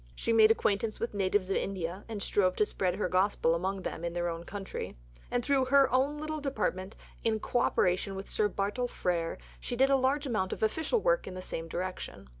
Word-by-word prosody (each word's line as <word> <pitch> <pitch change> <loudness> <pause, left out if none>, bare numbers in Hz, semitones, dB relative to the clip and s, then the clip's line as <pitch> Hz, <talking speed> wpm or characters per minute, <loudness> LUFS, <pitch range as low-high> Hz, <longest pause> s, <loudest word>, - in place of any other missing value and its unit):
She 230 - 0
made 220 -1 +7
acquaintance 215 0 +1
with 230 - -2
natives 195 -1 +1
of - - +2
India 185 0 -3
and 210 -3 -4
strove 185 -3 +2
to 210 - +3
spread 185 -3 -1
her 205 - 0
gospel 185 -2 +2
among 190 +3 -2
them 165 - -4
in 170 0 -2
their 175 0 -1
own 165 0 -5
country. 195 - -6 0.3
And 245 -1 -1
through 275 -2 +3
her 270 -1 +4
"own 275 +3 +2
little 310 0 -4
Department" 205 -8 -2 0.3
in 220 -1 +1
co 245 - 0
operation 190 -3 +1
with 195 +1 -6
Sir 210 - +1
Bartle 205 +5 -1
Frere 170 -7 -1 0.2
she 245 - -4
did 270 +3 +4
a - - +6
large 270 +3 +1
amount 200 -8 0
of - - -5
official 320 - +1
work - - +2
in 185 - -6
the - - -5
same 165 -2 -4
direction. 180 - -5
205 Hz, 215 wpm, -30 LUFS, 185-255 Hz, 0.3 s, made